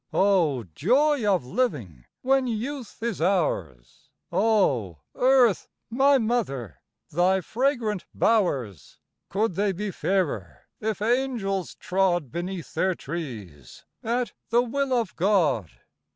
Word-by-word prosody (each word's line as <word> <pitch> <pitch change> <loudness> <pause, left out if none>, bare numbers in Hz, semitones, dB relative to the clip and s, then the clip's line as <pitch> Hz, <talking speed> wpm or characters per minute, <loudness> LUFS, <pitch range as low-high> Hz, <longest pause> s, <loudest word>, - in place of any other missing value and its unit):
Oh! 170 -11 +3
Joy 270 - +2
of 180 -9 +1
living 125 - -2 0.2
when 265 0 +2
youth 240 0 -5
is 230 -8 -2
ours! 95 - -1 0.2
Oh! 145 - +2 0.2
Earth 250 -6 +3 0.2
my 275 +3 +4
Mother, 140 - -2 0.3
thy 180 +4 +3
fragrant 230 - -1
bowers 140 - 0 0.3
Could 205 +1 0
they 200 +3 +1
be 200 +2 -4
fairer 145 - -2
if 215 -2 -2
Angels 230 -6 -1
trod 180 -7 0
Beneath 175 0 -5
their 185 -1 +1
trees 115 - -8 0.2
at 240 +1 -1 0.2
the 240 +1 +4
will 275 +3 -2
of 235 -6 0
God? 165 - +2
195 Hz, 110 wpm, -25 LUFS, 145-235 Hz, 0.3 s, my